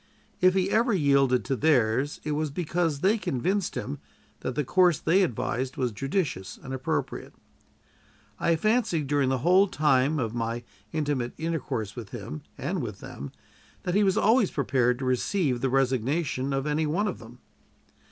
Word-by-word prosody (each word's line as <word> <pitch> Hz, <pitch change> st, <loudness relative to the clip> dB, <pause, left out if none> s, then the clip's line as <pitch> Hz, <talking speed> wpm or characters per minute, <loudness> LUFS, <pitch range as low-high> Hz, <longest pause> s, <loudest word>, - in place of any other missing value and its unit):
If 185 Hz, 0 st, +4 dB
he 190 Hz, +1 st, +1 dB
ever 230 Hz, +1 st, +3 dB
yielded 140 Hz, -6 st, +3 dB
to 135 Hz, -, 0 dB
theirs, 130 Hz, -1 st, +2 dB
it 150 Hz, -, -3 dB
was 150 Hz, +1 st, -1 dB
because 165 Hz, -1 st, -1 dB
they 210 Hz, +4 st, +3 dB
convinced 185 Hz, +5 st, -1 dB
him 140 Hz, +2 st, -4 dB, 0.4 s
that 130 Hz, -, -4 dB
the 150 Hz, -, +1 dB
course 180 Hz, +4 st, +4 dB
they 185 Hz, +5 st, +3 dB
advised 130 Hz, -, -1 dB
was 125 Hz, -2 st, 0 dB
judicious 135 Hz, -, -2 dB
and 135 Hz, -, -6 dB
appropriate. 130 Hz, -1 st, -3 dB, 1.0 s
I 170 Hz, -, +2 dB
fancied 215 Hz, -4 st, +1 dB
during 140 Hz, -1 st, +1 dB
the 130 Hz, -, +1 dB
whole 185 Hz, +3 st, +6 dB
time 150 Hz, -3 st, +2 dB
of 115 Hz, -5 st, -2 dB
my 115 Hz, 0 st, -2 dB, 0.3 s
intimate 145 Hz, -6 st, -1 dB
intercourse 135 Hz, -10 st, -3 dB
with 115 Hz, -5 st, -7 dB
him 120 Hz, +6 st, -7 dB, 0.2 s
and 185 Hz, -2 st, -2 dB
with 105 Hz, -6 st, -6 dB
them 70 Hz, 0 st, -8 dB, 0.5 s
that 180 Hz, -, -1 dB
he 205 Hz, +2 st, +4 dB
was 195 Hz, +1 st, +2 dB
always 220 Hz, 0 st, +4 dB
prepared 125 Hz, -3 st, +1 dB
to 130 Hz, -, -4 dB
receive 130 Hz, +1 st, 0 dB
the 135 Hz, -, +1 dB
resignation 135 Hz, +2 st, 0 dB
of 135 Hz, 0 st, -1 dB
any 150 Hz, +1 st, 0 dB
one 190 Hz, +8 st, 0 dB
of 195 Hz, -, -4 dB
them. 120 Hz, +1 st, -13 dB
145 Hz, 165 wpm, -27 LUFS, 125-175 Hz, 1.0 s, whole